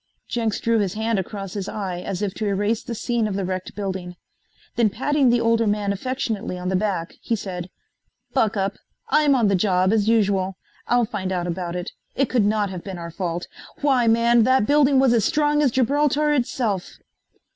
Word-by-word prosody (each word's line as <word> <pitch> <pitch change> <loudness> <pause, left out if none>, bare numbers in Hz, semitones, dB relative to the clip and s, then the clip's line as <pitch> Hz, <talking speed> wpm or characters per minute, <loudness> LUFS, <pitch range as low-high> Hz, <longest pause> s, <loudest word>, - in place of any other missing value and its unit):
Jenks 225 -3 -1
drew 230 -1 +2
his 195 -2 -1
hand 220 -1 0
across 195 0 -5
his 200 -2 -4
eye 190 -4 -4
as 190 +2 -4
if 195 -2 -1
to 215 - -3
erase 205 +3 0
the 235 - -6
scene 235 -1 0
of 200 - -3
the 195 -1 -1
wrecked 185 0 -4
building. 190 -3 -4 0.6
Then 235 -3 +3
patting 275 +5 +1
the 240 0 +3
older 230 -1 +2
man 205 -1 0
affectionately 220 -3 -3
on 180 0 -3
the 190 - 0
back 185 -4 -1
he 230 - -1
said: 185 -4 -6 0.6
"Buck 220 -6 +1
up. 195 +1 -1 0.3
I'm 295 -2 +4
on 235 -4 +3
the 200 - +2
job, 185 0 +2
as 215 -1 +2
usual. 195 -4 +1 0.3
I'll 245 0 +3
find 200 -4 -4
out 180 -2 -1
about 175 0 -3
it. 180 +2 -4 0.2
It 275 -2 +1
could 240 -5 +3
not 205 -1 +1
have 180 -2 -6
been 190 -2 -6
our 170 -1 -7
fault. 175 -1 -3 0.4
Why 265 -5 +3
man, 235 +1 +4
that 260 -1 +3
building 285 +1 +4
was 260 -2 +4
as 230 -3 +3
strong 295 +2 +2
as 285 - +4
Gibraltar 290 +4 +2
itself!" 235 -7 -1
210 Hz, 200 wpm, -23 LUFS, 190-240 Hz, 0.6 s, I'm